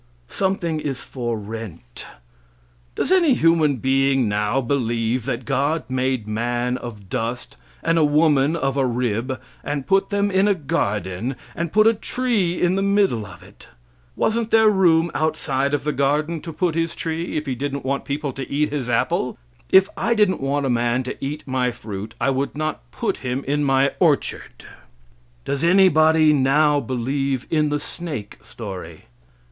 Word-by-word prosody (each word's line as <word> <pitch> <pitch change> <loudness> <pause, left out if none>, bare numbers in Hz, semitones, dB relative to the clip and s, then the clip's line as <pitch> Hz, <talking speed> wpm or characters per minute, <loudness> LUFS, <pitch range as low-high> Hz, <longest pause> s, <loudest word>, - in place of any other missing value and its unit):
Something 175 -5 -1
is 140 -4 -4
for 120 -3 -4
rent. 105 - -8 0.9
Does - - -1
any 340 -8 +5
human 165 - +3
being 135 0 +2
now 105 +4 0
believe 120 -2 -1
that 125 - -3
God 150 +7 0
made 130 -3 -1
man 120 +3 -1
of 105 -5 -9
dust 115 +5 -4 0.3
and 165 0 +2
a - - +4
woman 150 0 +3
of 135 -4 -1
a 135 - +2
rib, 125 +1 -1 0.2
and 145 -2 -3
put 195 0 +2
them 200 0 0
in 190 +2 +3
a 205 - +3
garden, 105 - -2 0.2
and 170 -1 -3
put 215 +1 +4
a 225 - +6
tree 215 -6 -1
in 175 0 +2
the 195 - 0
middle 195 - +1
of - - -13
it? - - -17 0.5
Wasn't 225 0 0
there 220 -1 +5
room 170 -4 +3
outside 140 -3 0
of 145 -2 -1
the 150 0 -1
garden 150 +4 0
to 165 - -7
put 165 +2 0
His 165 +1 -1
tree, 165 +1 -3
if 150 - -3
He 135 - -2
didn't 140 +2 -4
want 140 +1 -1
people 140 -1 -3
to 135 0 -7
eat 150 +2 +1
His 140 -4 -3
apple? 115 - 0 0.3
If 190 0 +6
I 235 0 0
didn't 205 -6 +2
want 140 +1 0
a - - 0
man 120 +1 +1
to 125 - -5
eat 150 +3 -4
my 130 -2 0
fruit 110 -3 -7
I - - +2
would 135 +2 -2
not 155 -5 -4
put - - -2
him 130 +1 -3
in 145 +1 +1
my 135 0 +3
orchard. - - 0 0.8
Does 140 +1 -2
anybody 160 -4 +5
now 145 +2 +3
believe 130 +1 -2
in 155 -2 +2
the 145 0 0
snake 145 -8 -6
story? 95 -7 -8
140 Hz, 170 wpm, -22 LUFS, 125-165 Hz, 0.9 s, a